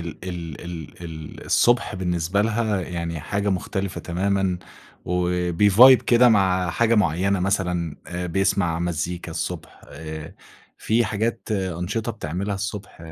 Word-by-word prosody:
ال 85 -2 -7
ال 85 -5 -6
ال 85 -1 -8
ال 80 -2 -8
الصبح 120 -3 +3
بالنسبة 90 +1 0
لها 110 -3 0
يعني 85 -2 -4
حاجة 100 +6 -2
مختلفة 95 0 -2
تمامًا، 95 +1 0 0.5
وبيvibe 90 +7 +5
كده 120 +1 +6
مع 95 -4 +3
حاجة 115 +5 +2
معيّنة، 95 -1 +2
مثلًا 90 -4 -1 0.3
بيسمع 90 -2 +1
مزيكا 85 0 -3
الصبح. 80 +1 -5
آآ، 80 +1 -8 0.4
في 115 +2 +2
حاجات 115 +3 -2
أنشطة 95 +4 -2
بتعملها 100 +1 -3
الصبح، 105 -1 -5
90 Hz, 120 wpm, -23 LUFS, 85-100 Hz, 0.5 s, كده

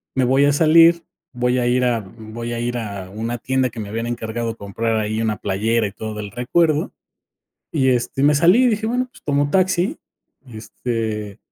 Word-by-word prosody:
me 130 - +2
voy 135 +3 +4
a 145 - +3
salir, 165 +3 +5 0.3
voy 125 0 0
a 120 - 0
ir 125 +1 +2
a 120 -2 +1
v 95 -2 -14 0.2
voy 120 +1 -4
a 120 - -3
ir 120 +1 -2
a 100 -5 -6
una 115 +4 -4
tienda", 130 +2 0
que 115 - -10
me 105 -2 -5
habían 115 +2 -3
encargado 115 -1 -3
comprar 110 +3 -2
ahí 110 +1 -2
una 110 -2 -1
playera 110 +4 0
y - - -8
todo 110 0 -6
el 105 -1 -6
recuerdo. 155 - +1 0.8
Y, 135 -5 +2
este, 125 +2 -1
me 150 +1 +5
salí 180 - +5
y - - +5
dije: 220 -1 -1
"Bueno, 250 +3 0
pues, - - -19
tomo 145 0 +1
taxi, 185 +1 +1 0.5
este, 110 -2 -4
120 Hz, 200 wpm, -20 LUFS, 110-145 Hz, 0.8 s, salir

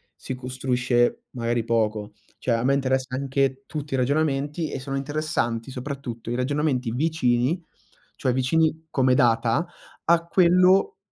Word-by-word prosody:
si 130 - -6
costruisce 125 -1 0
magari 120 -1 -1
poco. 110 -2 0 0.3
Cioè 125 - -1
a 115 - 0
me 135 +2 +3
interessa 130 -1 0
anche 135 0 0
tutti 150 -2 -5
i - - 0
ragionamenti 145 +3 0
e - - -4
sono 135 +1 -4
interessanti 135 -5 -2
soprattutto 125 -3 -6
i - - -1
ragionamenti 130 -1 0
vicini, 135 +2 +1 0.5
cioè 130 - 0
vicini 160 +5 +1
come 130 -2 +3
data, 120 +5 +2 0.4
a 170 0 +3
quello 185 +2 +4
130 Hz, 135 wpm, -24 LUFS, 125-150 Hz, 0.5 s, quello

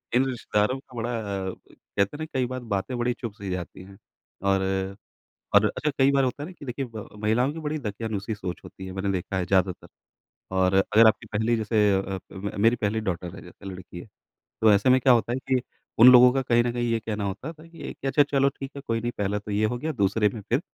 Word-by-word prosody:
इन 130 +2 +4
रिश्तेदारों 120 0 0
का 130 -2 -17
बड़ा 115 +1 -2
अ, 100 -3 -3 0.2
कहते - - -4 0.2
हैं - - -16
ना 155 - -3
कई 130 -1 +1
बार 130 +1 -4 0.2
बातें 110 +6 -3
बड़ी 120 0 0
चुभ 115 -4 -5
सी 100 -3 -7
जाती 90 0 -5
हैं। 95 +1 -14 0.5
और, 95 0 0 0.6
और 100 +1 +7
अच्छा 150 +7 -1
कई 135 +1 +5
बार 135 -1 +3
होता 130 +3 -2
है - - -4
ना - - -9
कि - - -10
देखिए 135 +1 -3
ब 110 - -7
महिलाओं 120 +6 +2
की 165 - -8
बड़ी 155 0 -2
दकियानूसी 110 -2 -4
सोच 90 -3 -6
होती 95 - -10
है, 95 - -6
मैंने 95 +1 -2
देखा 95 +1 -3
है 90 - 0
ज़्यादातर। 95 -1 +1 0.7
और 95 0 +3
अगर 105 +4 +5
आपकी 110 - +1
पहली 115 +2 +2
जैसे 105 -1 +2
अ, 95 0 -3
म 100 +1 -5
मेरी 115 +2 +5
पहली 110 -2 -1
डॉटर 85 0 -4
है, - - -10
जैसे - - -14
लड़की 90 -2 -8
है, - - -9 0.6
तो 110 -1 +6
ऐसे 100 +5 +3
में 130 +1 +5
क्या 130 0 +5
होता 120 0 +2
है 125 - -1
कि 130 -1 +3 0.4
उन 120 - +11
लोगों 125 0 +9
का 135 +1 0
कहीं 120 -2 +3
न 120 - 0
कहीं 120 0 -1
ये 115 - +2
कहना 110 -2 -3
होता 110 - -4
था 160 +1 -16
कि 165 -2 -8
अच्छा 145 +2 +4
चलो 140 -1 +2
ठीक 135 0 -6
है, - - -5
कोई 115 0 0
नहीं 120 +1 -2
पहला 100 0 0
तो 105 - -9
ये 105 +1 +1
हो 120 +3 0
गया, 155 +5 -2
दूसरे 105 -3 +2
में 110 - -6
फिर 125 +4 +2
110 Hz, 245 wpm, -26 LUFS, 100-125 Hz, 0.7 s, उन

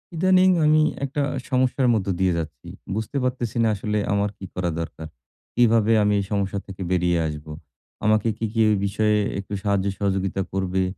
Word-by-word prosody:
ইদানিং 185 +2 +4 0.2
আমি 155 +1 +5 0.2
একটা 140 +2 -2 0.3
সমস্যার 130 0 +2
মধ্য 100 -3 -1
দিয়ে 95 -1 +2
যাচ্ছি। 75 -6 -6 0.3
বুঝতে 110 +6 -3
পারতেছি 125 -2 -2
না, - - +3
আসলে 105 +1 -2 0.2
আমার 100 0 +1
কি 95 - -8
করা 90 -1 -1
দরকার? 80 -1 -6 0.5
কিভাবে 115 -2 +4
আমি 105 0 +2
এই 100 - -2
সমস্যা 100 -1 -1
থেকে 95 -1 -9
বেরিয়ে 90 -1 +2
আসবো? 75 0 -7 0.5
আমাকে 110 +1 +3
কি 115 - -2
কেউ 110 -1 +4
এই 100 - 0
বিষয়ে 105 +1 +1 0.2
একটু 100 +1 -7
সাহায্য 100 -2 +1
সহযোগিতা 95 -1 -1
করবে? 95 -1 0
100 Hz, 170 wpm, -23 LUFS, 95-115 Hz, 0.5 s, আমি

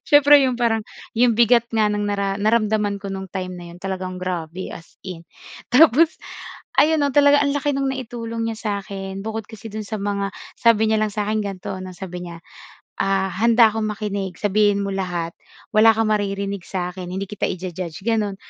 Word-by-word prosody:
siyempre 290 -1 +7
'yong 255 -2 0
parang 225 -2 +1 0.4
'yong 240 -2 +5
bigat 235 0 +5
nga 220 -2 +2
ng 210 0 -1
nara 200 -1 -1
naramdaman 210 -1 +1
ko 200 - -5
nung 190 0 -5
time 185 -1 -4
na 175 -1 -9
'yon 175 - -13
talagang 185 -1 -4
grabe 180 0 -4
as 165 - -14
in! 175 -3 -7 0.5
Tapos 315 +4 +5 0.6
ayon 315 +1 +3
'no, 285 - +2
talaga 285 0 +6
ang 280 - 0
laki 290 0 0
no'ng 275 0 0
naitulong 230 -2 -4
niya 225 - -5
sa'kin 195 -3 -4
bukod 220 0 -4
kasi 220 0 -10
do'n 215 -1 -5
sa 215 +1 -4
mga, 200 -1 -1 0.3
sabi 220 -2 +4
niya 220 - +3
lang 215 - 0
sa 210 -1 -1
akin 215 - +1
ganito 195 -3 -5
'no, 185 0 -7
sabi 180 -1 -7
niya, 170 -1 -8 0.6
ah 195 0 +1
"Handa 230 +4 +5
akong 220 0 -2
makinig 200 -3 -3
sabihin 205 0 +2
mo 200 - -3
lahat. 175 -3 -2 0.4
Wala 220 +1 +7
kang 220 -1 +1
maririnig 200 -2 -1
sa 180 -2 -3
akin. 180 -1 -7
Hindi 190 +2 -3
kita 210 - -2
i-ju-judge", 180 -1 -5
gano'n 215 -4 0
205 Hz, 190 wpm, -22 LUFS, 190-230 Hz, 0.6 s, siyempre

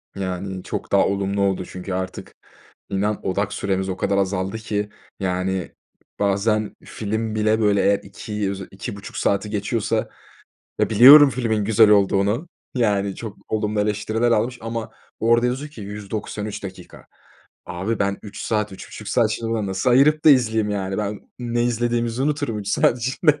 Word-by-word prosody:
Yani, 95 0 -4
çok - - -5
daha - - +4
olumlu 100 0 -1
oldu 95 -2 0
çünkü 95 +1 -7
artık 95 0 -5 0.5
inan 100 +1 -1
odak 100 +2 -1
süremiz 95 -1 -1
o 95 - -3
kadar 100 +1 0
azaldı 95 +1 -1
ki, 105 -2 -3 0.3
yani, 95 -1 -2 0.5
bazen 105 +2 +1
film 110 +1 -3
bile, 110 +1 +2
böyle, 105 -2 +3
eğer 100 0 +3
2 105 0 -4
öze 95 -1 -6
2,5 100 +1 -7
saati 100 +1 0
geçiyorsa, 105 +1 -1 0.7
ya - - +2
biliyorum 135 +7 +9
filmin 115 -5 -1
güzel 110 0 +5
olduğunu, 100 - +3 0.3
yani, 100 -5 +1
çok 110 -3 -7
olumlu 105 -1 -1
eleştiriler 110 +3 0
almış 120 +3 +1
ama 115 0 -4 0.3
orada 115 +2 +3
yazıyor 135 +4 -2
ki 115 - -10
193 105 +1 -5
dakika. 95 -2 -10 0.6
Abi, 95 +6 -3
ben 100 0 0
3 105 -1 -9
saat 105 -2 -1
3,5 100 +2 -9
saat 115 -3 +2
şimdi 115 +1 -3
buna 110 -3 -1
nasıl 95 +6 0
ayırıp 150 +5 +4
da 155 - +9
izleyeyim, 110 -5 +3
yani, 95 -1 -2
ben 105 -1 -3 0.2
ne 120 -1 -1
izlediğimizi 120 0 0
unuturum 145 -6 -1
3 100 -1 -6
saat 120 +3 +3
içinde. 145 +5 +1
105 Hz, 155 wpm, -22 LUFS, 100-115 Hz, 0.7 s, biliyorum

